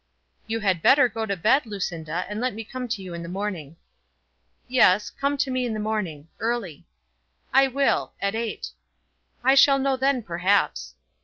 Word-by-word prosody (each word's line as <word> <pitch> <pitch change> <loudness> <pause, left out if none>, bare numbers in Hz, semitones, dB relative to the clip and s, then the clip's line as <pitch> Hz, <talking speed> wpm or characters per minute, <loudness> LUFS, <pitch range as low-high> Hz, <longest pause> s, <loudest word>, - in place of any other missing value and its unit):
"You 225 0 -2
had 190 -5 +1
better 270 - +6
go 225 -1 -4
to 200 -2 -2
bed, 235 - +2
Lucinda, 175 -4 -4
and 210 +3 -5
let 250 -4 -1
me 225 - -5
come 250 +3 -6
to 220 -4 -4
you 180 -2 -7
in 170 - -6
the 170 - -7
morning." 180 -6 -5 0.9
"Yes; 210 -5 +3
come 280 +1 -1
to 275 -1 0
me 255 0 0
in 235 -3 -2
the - - -3
morning; 200 -9 -3
early." 225 -10 -3 0.7
"I 270 +1 +6
will, 275 +1 0
at 200 0 -1
eight." 225 0 -4 0.7
"I 265 +2 +5
shall 275 0 +6
know 270 0 +1
then, 265 -2 +1
perhaps." 185 +2 0
220 Hz, 175 wpm, -24 LUFS, 185-255 Hz, 0.9 s, better